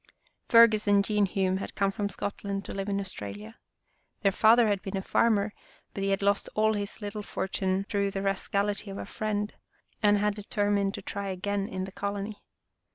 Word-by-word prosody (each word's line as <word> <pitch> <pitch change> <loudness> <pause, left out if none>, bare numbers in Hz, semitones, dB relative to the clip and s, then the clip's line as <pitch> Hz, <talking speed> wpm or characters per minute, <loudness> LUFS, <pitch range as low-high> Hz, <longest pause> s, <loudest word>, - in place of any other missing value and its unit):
Fergus 230 -3 +6
and 200 -1 +4
Jean 210 -1 +2
Hume 190 0 0
had 195 - -6
come 195 -1 +2
from 200 0 -2
Scot 200 - -5
land 200 -1 -3
to - - -6
live 195 +1 -3
in 200 0 0
Australia. 105 - -7 0.6
Their 195 - +4
father 225 +4 +6
had 200 -2 +1
been 195 0 -4
a 190 - -3
farmer, 215 -2 +2 0.4
but 195 - -4
he 195 - 0
had 195 0 0
lost 200 0 +2
all 220 0 +3
his 205 +1 -4
little 205 +1 -4
fortune 190 -1 -1
through 200 -1 0
the 195 0 -4
rascality 200 +1 0
of 195 - -6
a - - -5
friend, 210 -1 -2 0.5
and 205 -1 +5
had 210 0 +1
deter 205 0 -1
mined 200 -1 +1
to - - -8
try 200 -2 -4
again 195 +1 -2
in 185 0 -4
the 190 - -6
colony. 200 +1 -4
200 Hz, 200 wpm, -28 LUFS, 195-210 Hz, 0.6 s, Fergus